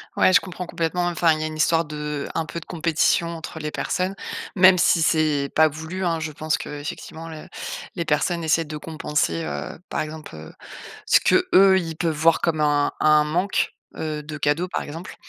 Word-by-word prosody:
Ouais, 185 - +4
je - - +8
comprends 180 -1 -7
complètement. 170 +1 -1
Enfin, 170 -1 +3
il 155 - -3
y - - -1
a - - -1
une 155 0 -7
histoire 165 +1 +2
de 150 -1 -4
un 160 - -1
peu 170 - -6
de - - -14
compétition 170 0 +1
entre 160 -1 -7
les 150 0 -4
personnes, 185 +2 -2 0.4
même 185 0 +7
si 170 -1 +3
c'est 155 -4 +2
pas 160 0 +6
voulu 160 +5 -5
hein. 165 -1 0
Je 160 -1 -4
pense, 155 +1 -1
qu'effectivement, 150 +2 -7
la 155 -1 -9 0.5
les 170 -2 -2
personnes 165 +3 0
essaient 160 0 +2
de 150 0 -6
compenser, 150 - -2
heu, 75 -1 -5
par - - -1
exemple, 155 - -7
heu, 80 0 -10 0.5
ce - - +5
que - - +3
eux, 190 0 +7
ils 165 -2 -5
peuvent 165 -3 0
voir 165 +2 +3
comme 160 -2 0
un 145 -1 +2
un 150 0 +5
manque, 180 +6 0 0.2
heu, 155 -1 -4
de 155 0 -7
cadeaux 150 +5 0
par - - -1
exemple 165 +5 -8
160 Hz, 205 wpm, -23 LUFS, 150-170 Hz, 0.5 s, je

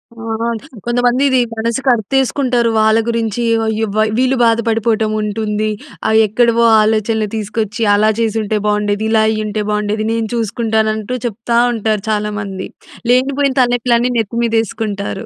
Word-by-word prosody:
ఆ! - - -22 0.7
కొంతమంది 245 +2 +1
ఇది 260 -1 +3 0.2
మనసుకు 230 +4 -1
అర్తేసుకుంటారు. 250 +1 0
వాళ్ళ 220 +1 +4
గురించి 230 -1 -1 0.2
వ - - -1
అయ్యో! 220 0 -1
వ - - -2 0.2
వీళ్ళు 260 +1 +2
బాధపడిపోవటం 225 -1 +1
ఉంటుంది. 210 0 -2 0.4
ఆ 220 - +1 0.2
ఎక్కడివో 235 +2 +2 0.2
ఆలోచనలు 220 0 0
తీసుకొచ్చి 215 +1 -3
అలా 215 +1 +3
చేసుంటే 220 -2 0
బాగుండేది, 210 0 0
ఇలా 220 -1 +4
అయ్యుంటే 215 -1 -2
బాగుండేది. 210 +1 -1
నేను 230 -1 -1
చూసుకుంటాను 220 -1 0
అంటూ 220 +3 -4
చెప్తా 235 +1 -2 0.2
ఉంటారు 215 -2 -1
చాలామంది. 210 -3 -3 0.4
లేనిపోయిన 270 +2 +2
తలనొప్పులన్నీ 245 0 +2
నెత్తి 225 +2 -2
మీద 230 -1 -1
యేసుకుంటారు. 210 0 -4
220 Hz, 135 wpm, -16 LUFS, 215-235 Hz, 0.7 s, వాళ్ళ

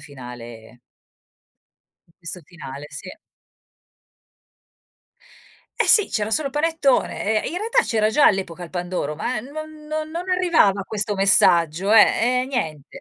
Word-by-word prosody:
finale 120 -4 -12 1.3
in 165 - -29
questo 180 +1 -5
finale, 145 -4 -10
sì. 170 +5 -9 2.7
Eh - - +2
sì, 420 - +5
c'era 210 0 -2
solo 285 +2 -1
panettone. 280 -8 0
Ehm, - - -5
in - - -5
realtà 450 +2 -2
c'era 215 -2 +1
già 290 +4 +4
all'epoca 185 -3 0
il 170 - -12
pandoro, 175 -4 -3
ma 215 +8 -3
non 310 +3 -10
non 310 0 -4
non 350 +3 -6
arrivava 340 - +2
questo 210 0 -2
messaggio, 190 -1 +3
eh, 240 +3 +4
eh - - -2
niente. 160 - -5
205 Hz, 130 wpm, -22 LUFS, -, 2.7 s, sì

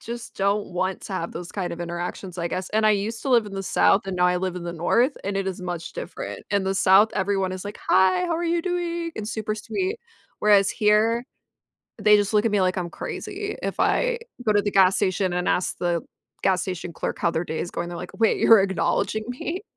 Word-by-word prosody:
just 235 +1 -8
don't 200 +1 0
want 185 +1 -1
to 195 - -7
have 170 -2 -3
those 175 0 -7
kind 185 -4 -3
of 170 - -7
interactions, 175 +1 -5
I 170 - -1
guess, 185 +1 -3
and 215 0 +2
I - - +6
used 210 +3 -1
to 275 - -3
live 235 -4 +4
in 195 - -8
the 195 - -3
South, 195 - +3
and 190 - -3
now 180 0 +4
I 180 0 +2
live 185 0 -2
in 180 - -6
the 170 0 -4
North, 235 - +1
and 200 0 -2
it 195 -1 -1
is 185 - -5
much 175 -2 -5
different. - - -7
In 200 -1 +2
the 190 0 0
South, 195 +3 +6
everyone 195 -1 0
is 185 +1 -6
like, 205 +1 -7
"Hi, 190 0 +4
how 335 -2 0
are 345 - -2
you 340 0 +1
doing?" 345 -2 -2
and 210 - -4
super 215 -1 -2
sweet, 375 - -3 0.4
whereas 205 -2 +4
here, 220 +2 +2 0.8
they 210 0 +6
just 205 +1 0
look 210 +1 +4
at 230 - +2
me 205 - +3
like 185 +1 +1
I'm 175 -2 -3
crazy. 415 0 -5
If - - -3
I - - +2 0.3
go 215 - +4
to 205 -1 +3
the 205 - -1
gas 190 -1 +5
station 185 -2 0
and 180 0 -1
ask 180 - 0
the 175 -2 0 0.4
gas 185 -2 +2
station 180 -2 -5
clerk - - -4
how 170 - +1
their 165 +1 -2
day 160 - -4
is 175 - -3
going, 175 - -4
they're 175 - -6
like, 180 - -9
"Wait, 225 - +3
you're 225 -3 +7
acknowledging 200 +2 0
me?" 325 +10 -4
195 Hz, 240 wpm, -24 LUFS, 180-220 Hz, 0.8 s, you're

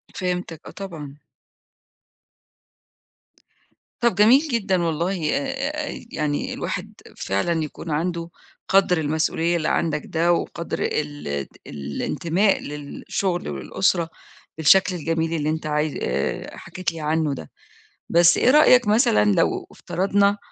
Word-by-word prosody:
فهمتك 180 -3 -3
آه - - -8
طبعًا. 155 -7 -8 2.8
طَب 235 -6 +2
جميل 225 +7 +7
جدًا 200 - 0
والله 165 0 -1
آآ 280 +2 -3
يعني 150 -2 -2
الواحد - - -4 0.2
فعلًا 160 - 0
يكون 155 +2 -7
عنده 170 +2 -2 0.4
قَدْر 190 -2 +4
المسئولية 160 +2 0
اللي 160 -1 -2
عندك 150 -3 0
ده 170 +1 +2
وقَدْر 170 0 -3
ال 145 - -2
ال 70 -1 -3 0.2
الإنتماء 160 - 0
للشغل 150 - -3
وللأسرة 165 - 0 0.5
بالشكل 180 +4 +5
الجميل 165 0 -1
اللي 155 -2 -1
أنت 160 0 -2
عايز 150 0 0
آآ 65 +2 -2
حكيت 185 -3 -4
لي 165 - -8
عنه 155 -1 0
ده. 80 - -8 0.6
بس 170 0 +5
إيه 250 - +4
رأيك 255 -6 +6
مثلًا 210 - +4
لو - - +1
افترضنا 200 +2 +1
165 Hz, 115 wpm, -23 LUFS, 150-195 Hz, 2.8 s, جميل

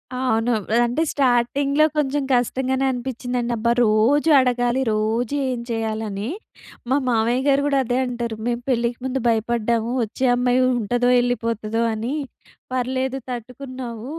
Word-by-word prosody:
అవును. 245 -2 +1 0.3
అంటే, 245 +6 -1
స్టార్టింగ్‌లో 275 +3 +2
కొంచెం 290 -1 +1
కష్టంగానే 260 +2 +1
అనిపించిందండి. 245 -1 -3
అబ్బా! 235 +1 +1
రోజూ 230 +9 +3
అడగాలి, 245 0 +1
రోజూ 220 +4 0
ఏం 250 -2 -2
చేయాలని. 220 -2 -3 0.6
మా 265 - +3
మావయ్య 235 +1 +2
గారు 280 0 +4
గూడా 280 -1 +2
అదే 245 +2 0
అంటారు. 240 -2 -3
"మేము 240 0 -1
పెళ్ళికి 235 -1 0
ముందు 260 0 -1
భయపడ్డాము. 230 0 0
వచ్చే 225 +4 -3
అమ్మాయి 250 +1 +2 0.2
ఉంటదో, 245 +2 +1
వెళ్ళిపోతదో" 230 -2 -1
అని. 225 +5 -3 0.6
"పర్లేదు 260 +1 -1
తట్టుకున్నావు." 250 0 -7
245 Hz, 125 wpm, -22 LUFS, 230-260 Hz, 0.6 s, గారు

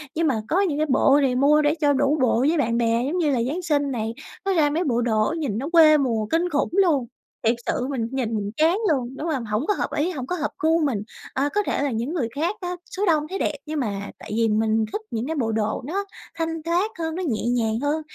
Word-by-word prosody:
nhưng 325 0 +1
mà 270 - +2
có 365 +5 +2
những 320 -7 0
cái 310 - +1
bộ 275 +2 +4
thì 260 -3 +2
mua 290 +4 +4
để 295 +1 +2
cho 290 -1 +4
đủ 280 +2 +2
bộ 245 -2 +3
với 330 +2 +2
bạn 235 -5 +1
bè, 230 0 +1
giống 330 +6 -1
như 315 -5 +2
là 245 -4 +1
Giáng 320 +7 -2
sinh 290 -5 0
này, 225 -2 -2 0.3
nó 390 - +2
ra 310 -5 +3
mấy 320 +5 0
bộ 240 -7 +1
đồ 220 +2 +1
nhìn 275 -10 -2
nó 275 +6 -3
quê 320 -3 +7
mùa 235 -6 0
kinh 330 +10 0
khủng 285 -3 0
luôn! 340 -9 +3 0.4
Thiệt 225 +2 +4
sự 250 - -1
mình 255 -5 -2
nhìn 245 -4 -2
mình 205 -1 -2
chán 325 +4 +3
luôn, 260 -3 -1
đúng 320 - -4
hông? 265 -7 -2
Hổng 215 +5 -1
có 415 - +3
hợp - - -2
ý, 325 +5 +1
hổng 265 -7 -5
có 360 - -1
hợp 305 -3 -2
gu 320 +1 +3
mình. 235 -8 0 0.3
Ờ, 280 +2 0
có 415 - +4
thể - - -1
là 285 - 0
những 235 +8 -2
người 275 -10 0
khác 335 +7 0
á, 360 0 -3 0.2
số 405 - +1
đông 315 -5 +3
thấy 390 - -4
đẹp, 305 - 0
nhưng 310 0 -3
mà 200 -5 -3
tại 215 - -9
vì 230 0 +2
mình 220 +1 +2
thích 430 - -2
những 225 +1 -2
cái 320 - -2
bộ 230 -5 0
đồ 215 +1 -1
nó 395 +6 -2 0.3
thanh 325 -1 -3
thoát 350 +6 0
hơn, 320 -1 -2
nó 370 - -3
nhẹ 220 -5 -1
nhàng 230 -2 +1
hơn 290 +3 0
285 Hz, 270 wpm, -23 LUFS, 235-325 Hz, 0.4 s, quê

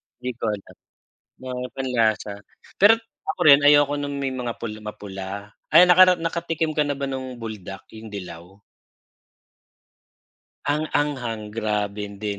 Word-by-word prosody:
hindi 125 - -8
ko - - -3
alam, 105 -2 -5 0.6
mga 125 -1 -5
panlasa, 115 -5 0 0.5
pero 220 +3 +7 0.3
ako - - -6
rin 140 0 +8
ayoko 145 0 +5
ng 145 0 -3
may 135 -1 -2
mga 120 -2 -4
pula 110 -2 -6
mapula. 100 -2 -7 0.4
Ay, 175 +3 +8
nakara 180 0 +7
nakatikim 165 -2 -2
ka 150 - +2
na 145 -1 -2
ba 140 - -2
nung 130 -2 -5
buldak? 105 -4 -8
Yung 110 -1 -10
dilaw. 90 -1 -9 2.1
Ang 155 +2 0
anghang 120 -7 -2
grabe, 105 -2 -2
hindi 100 0 -5
125 Hz, 135 wpm, -23 LUFS, 105-145 Hz, 2.1 s, rin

